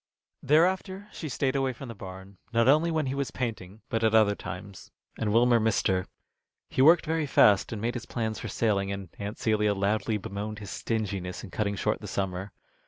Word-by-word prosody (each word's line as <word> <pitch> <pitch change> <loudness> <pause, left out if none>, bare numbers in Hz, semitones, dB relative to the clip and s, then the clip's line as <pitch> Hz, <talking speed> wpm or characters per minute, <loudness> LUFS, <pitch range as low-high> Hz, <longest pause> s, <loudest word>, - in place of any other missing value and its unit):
Thereafter 185 +6 +2
she 155 - -6
stayed 130 0 0
away 135 -1 +1
from 130 +3 -9
the 115 - -6
barn, 95 -1 -10
not 115 0 +3
only 155 +5 +5
when 160 -3 0
he 130 - -2
was 140 -1 -2
painting, 110 -5 -5
but 115 -2 -1
at 110 0 +3
other 110 -2 +5
times, 100 0 -8 0.3
and 105 -2 -1
Wilmer 120 +1 +5
missed 110 0 +1
her. 95 -1 0 0.6
He - - 0
worked 165 +5 +6
very 160 -1 0
fast, 105 -7 +5
and 110 - -4
made 115 +3 -1
his 115 -3 -6
plans 110 -2 -3
for - - -5
sailing, 100 -2 0
and 100 -3 -5
Aunt 100 +2 -5
Celia 105 -2 +1
loudly 105 +2 0
bemoaned 105 +2 -5
his 100 -2 -8
stinginess 100 -5 -3
in 100 - -9
cutting 100 -1 -1
short - - -1
the - - -7
summer. 95 0 -3
110 Hz, 200 wpm, -28 LUFS, 100-130 Hz, 0.6 s, worked